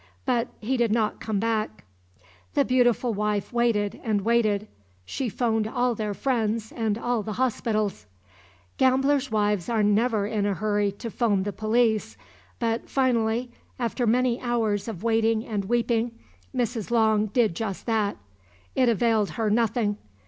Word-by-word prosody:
But 245 Hz, -2 st, +1 dB
he 255 Hz, +5 st, -1 dB
did 235 Hz, -3 st, +2 dB
not 220 Hz, -1 st, +1 dB
come 215 Hz, -3 st, -2 dB
back. 215 Hz, -, -1 dB, 0.7 s
The -, -, +3 dB
beautiful 245 Hz, -1 st, +2 dB
wife 210 Hz, +1 st, -1 dB
waited 230 Hz, -4 st, +1 dB
and 215 Hz, -3 st, 0 dB
waited. 215 Hz, -2 st, +1 dB, 0.4 s
She 255 Hz, -, -3 dB
phoned 220 Hz, 0 st, 0 dB
all 245 Hz, +2 st, +1 dB
their 210 Hz, -2 st, -3 dB
friends 225 Hz, -1 st, -1 dB
and 220 Hz, -3 st, -1 dB
all 240 Hz, -1 st, -1 dB
the 215 Hz, +1 st, -5 dB
hospitals. 215 Hz, -, -1 dB, 0.7 s
Gamblers' 270 Hz, +1 st, +3 dB
wives 210 Hz, -4 st, +1 dB
are 225 Hz, -2 st, +2 dB
never 210 Hz, +1 st, +2 dB
in 205 Hz, -1 st, -1 dB
a 200 Hz, -, 0 dB
hurry 205 Hz, 0 st, 0 dB
to 230 Hz, +3 st, -7 dB
phone 205 Hz, -5 st, +1 dB
the 205 Hz, 0 st, -3 dB
police 220 Hz, 0 st, +1 dB, 0.4 s
but 230 Hz, -1 st, -2 dB
finally, 240 Hz, -2 st, +1 dB, 0.3 s
after 240 Hz, 0 st, -1 dB
many 245 Hz, +1 st, +2 dB
hours 225 Hz, -4 st, 0 dB
of 210 Hz, -4 st, -6 dB
waiting 225 Hz, -1 st, +2 dB
and 205 Hz, -3 st, -3 dB
weeping, 230 Hz, +1 st, 0 dB, 0.3 s
Mrs. 235 Hz, -4 st, -2 dB
Long 220 Hz, -2 st, +3 dB
did 220 Hz, -2 st, +2 dB
just 200 Hz, -1 st, -4 dB
that. 215 Hz, -, 0 dB, 0.6 s
It 255 Hz, -2 st, +3 dB
availed 225 Hz, -2 st, +2 dB
her 220 Hz, -2 st, +1 dB
nothing. 220 Hz, -2 st, +1 dB
225 Hz, 150 wpm, -25 LUFS, 210-240 Hz, 0.7 s, The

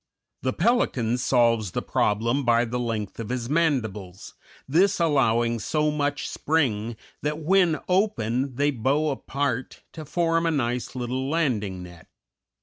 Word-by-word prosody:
The 130 Hz, 0 st, -1 dB
pelican 130 Hz, -, +1 dB
solves 115 Hz, -6 st, +2 dB
the -, -, -2 dB
problem 115 Hz, +7 st, +1 dB
by 120 Hz, -1 st, +3 dB
the 120 Hz, +1 st, -3 dB
length 115 Hz, -4 st, -3 dB
of 115 Hz, -1 st, -5 dB
his 125 Hz, -2 st, -2 dB
mandibles, 110 Hz, -, -1 dB, 0.3 s
this 180 Hz, +7 st, +3 dB
allowing 120 Hz, -7 st, +2 dB
so 150 Hz, +5 st, 0 dB
much 145 Hz, -1 st, -1 dB
spring 120 Hz, -8 st, 0 dB, 0.3 s
that 150 Hz, +1 st, -1 dB
when 170 Hz, 0 st, +3 dB
open 135 Hz, -, 0 dB
they 145 Hz, +3 st, +2 dB
bow 140 Hz, +5 st, +1 dB
apart 135 Hz, -2 st, -3 dB
to 160 Hz, -, -8 dB
form 165 Hz, +2 st, +1 dB
a -, -, +3 dB
nice 125 Hz, -5 st, -1 dB
little 130 Hz, +2 st, -2 dB
landing 110 Hz, -, -1 dB
net. 85 Hz, -2 st, -13 dB
130 Hz, 140 wpm, -25 LUFS, 115-155 Hz, 0.3 s, by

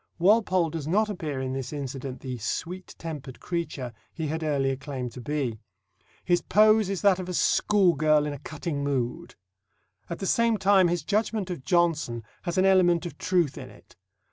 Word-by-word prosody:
Walpole 185 Hz, -3 st, +3 dB
does 155 Hz, -3 st, -5 dB
not 210 Hz, +5 st, +2 dB
appear 155 Hz, -8 st, -4 dB
in 130 Hz, 0 st, -3 dB
this 135 Hz, -1 st, -4 dB
incident 135 Hz, -2 st, -5 dB
the 130 Hz, -2 st, -5 dB
"sweet 175 Hz, -, -4 dB
tempered 145 Hz, -6 st, -7 dB
creature" 150 Hz, -8 st, -4 dB, 0.2 s
he 160 Hz, -, -4 dB
had 160 Hz, +2 st, -2 dB
earlier 140 Hz, -3 st, 0 dB
claimed 130 Hz, -2 st, -5 dB
to 125 Hz, -, -9 dB
be. 130 Hz, -4 st, -2 dB, 0.7 s
His 175 Hz, -1 st, +3 dB
pose 215 Hz, -1 st, +4 dB
is 195 Hz, -1 st, -3 dB
that 195 Hz, -2 st, +4 dB
of 185 Hz, -1 st, -5 dB
a 180 Hz, -, -3 dB
schoolgirl 155 Hz, -9 st, +3 dB
in 150 Hz, -, -3 dB
a 145 Hz, -, -8 dB
cutting 155 Hz, -1 st, -4 dB
mood. 130 Hz, -4 st, -2 dB, 0.7 s
At 170 Hz, -, -4 dB
the 195 Hz, -, -5 dB
same 230 Hz, +3 st, +2 dB
time 190 Hz, -2 st, +4 dB
his 175 Hz, 0 st, -1 dB
judgment 210 Hz, -2 st, -1 dB
of 170 Hz, -7 st, -6 dB
Johnson 165 Hz, -, +1 dB, 0.2 s
has 175 Hz, 0 st, -3 dB
an 185 Hz, -, +4 dB
element 180 Hz, -3 st, +4 dB
of 175 Hz, -, -7 dB
truth 175 Hz, -6 st, +1 dB
in -, -, -9 dB
it. -, -, -18 dB
165 Hz, 180 wpm, -26 LUFS, 140-185 Hz, 0.7 s, pose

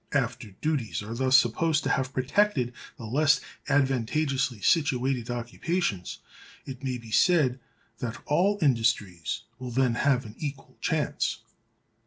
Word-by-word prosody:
After 125 Hz, -5 st, -1 dB
duties 120 Hz, 0 st, -2 dB
are 110 Hz, +2 st, -6 dB
thus 130 Hz, +2 st, +4 dB
supposed 155 Hz, +7 st, +2 dB
to -, -, 0 dB
have 130 Hz, -1 st, 0 dB
protected 130 Hz, -1 st, +1 dB, 0.2 s
the 115 Hz, -, -8 dB
less 145 Hz, +6 st, +3 dB, 0.3 s
advantageously 135 Hz, -1 st, +1 dB
situated 130 Hz, -, +1 dB
occupations, 120 Hz, -, -2 dB, 0.5 s
it 135 Hz, 0 st, -8 dB
may 130 Hz, -2 st, -1 dB
be 115 Hz, -2 st, -12 dB
said 140 Hz, -4 st, +3 dB, 0.4 s
that 120 Hz, -1 st, -4 dB
all 190 Hz, +7 st, +2 dB
industries 115 Hz, -, +1 dB, 0.2 s
will 125 Hz, -1 st, -5 dB
then 125 Hz, 0 st, +2 dB
have 125 Hz, +1 st, +2 dB
an 105 Hz, -, -9 dB
equal 140 Hz, -2 st, -6 dB
chance. -, -, -1 dB
130 Hz, 130 wpm, -27 LUFS, 115-145 Hz, 0.5 s, thus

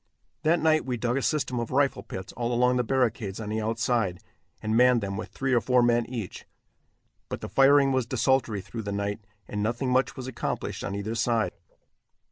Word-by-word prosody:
That 165 Hz, +2 st, +3 dB
night 155 Hz, -1 st, +3 dB
we 125 Hz, -2 st, -2 dB
dug 120 Hz, +3 st, 0 dB
a -, -, 0 dB
system 135 Hz, -5 st, 0 dB
of 115 Hz, -, -3 dB
rifle 140 Hz, +1 st, +1 dB
pits 95 Hz, 0 st, -8 dB
all 120 Hz, 0 st, -2 dB
along 125 Hz, +1 st, +3 dB
the 125 Hz, -, +2 dB
barricades 115 Hz, -5 st, 0 dB
on 105 Hz, -2 st, -5 dB
the 110 Hz, +1 st, -1 dB
outside, 110 Hz, -3 st, 0 dB, 0.4 s
and 110 Hz, +1 st, -1 dB
manned 125 Hz, 0 st, +5 dB
them 100 Hz, -1 st, -3 dB
with -, -, -5 dB
three 135 Hz, -1 st, -2 dB
or 120 Hz, -, +4 dB
four 125 Hz, 0 st, +3 dB
men 120 Hz, -1 st, +2 dB
each, 115 Hz, -7 st, -6 dB, 0.8 s
but -, -, -5 dB
the -, -, -5 dB
firing 135 Hz, 0 st, +5 dB
was 130 Hz, -3 st, 0 dB
desultory 125 Hz, -4 st, +1 dB
through 100 Hz, +4 st, -7 dB
the 100 Hz, -1 st, -5 dB
night, 100 Hz, +1 st, -2 dB, 0.3 s
and 105 Hz, -, -3 dB
nothing 120 Hz, +4 st, -1 dB
much 130 Hz, +1 st, +2 dB
was 130 Hz, -, -5 dB
accomplished 130 Hz, -, -4 dB
on 100 Hz, -, -3 dB
either 100 Hz, +2 st, -3 dB
side. 115 Hz, -4 st, +1 dB
120 Hz, 200 wpm, -27 LUFS, 110-130 Hz, 0.8 s, manned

